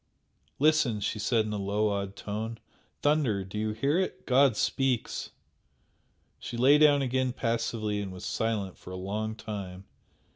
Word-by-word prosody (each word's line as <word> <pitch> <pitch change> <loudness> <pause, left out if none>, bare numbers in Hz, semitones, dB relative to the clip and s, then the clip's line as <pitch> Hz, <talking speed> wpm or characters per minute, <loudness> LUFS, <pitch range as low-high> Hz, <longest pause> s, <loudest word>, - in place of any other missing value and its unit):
"Listen!" 150 -7 +3
she 105 +1 -2
said 110 +1 +2
in 105 - -3
a 105 - -2
low, 105 +2 +1
awed 100 -1 -3
tone 110 +2 -4 0.5
"Thunder! 145 -10 +2
Do 95 +3 -5
you 110 0 0
hear 140 +10 +1
it? 190 - -3
God 130 -3 +4
speaks!" 130 -4 0 1.1
She 120 - -6
lay 135 +5 +6
down 145 -2 +5
again 130 -1 0
passively 115 -3 -1
and 100 -2 -5
was 90 -1 -8
silent 105 -4 -2
for - - -11
a 95 - -6
long 105 +4 -3
time. 100 -4 -7
110 Hz, 155 wpm, -29 LUFS, 100-130 Hz, 1.1 s, lay